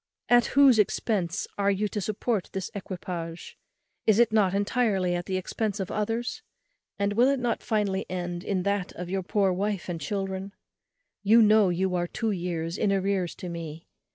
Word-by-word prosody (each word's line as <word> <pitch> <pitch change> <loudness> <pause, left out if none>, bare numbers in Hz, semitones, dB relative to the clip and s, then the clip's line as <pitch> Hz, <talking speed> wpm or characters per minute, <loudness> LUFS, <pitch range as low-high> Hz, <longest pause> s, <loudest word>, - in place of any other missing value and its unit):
At 240 -1 +5
whose 270 -5 +7
expence 200 -3 0
are 200 0 +3
you 200 +1 +1
to 210 - -3
support 215 +1 -1
this 190 -1 -4
equipage? 175 -3 -6 0.5
is 215 -2 +5
it 235 -1 +4
not 195 -3 +3
entirely 200 -3 +1
at 175 0 -3
the 190 - -1
expence 210 +2 -2
of 190 - -3
others? 230 - -2 0.6
and 200 0 0
will 240 +4 +4
it 275 -1 +2
not 240 -2 -1
finally 205 -3 -1
end 175 -1 -4
in 190 -3 -1
that 200 -1 -1
of 180 0 -6
your 195 0 0
poor 195 0 +1
wife 200 0 -2
and 165 -2 -4
children? 195 +3 -3 0.7
you 215 +3 +6
know 210 -2 +5
you 180 +1 0
are 175 -1 0
two 225 +4 -2
years 170 -2 -3
in 210 - +2
arrears 195 -2 0
to 180 - -7
me. 165 -2 -7
195 Hz, 180 wpm, -27 LUFS, 180-215 Hz, 0.7 s, whose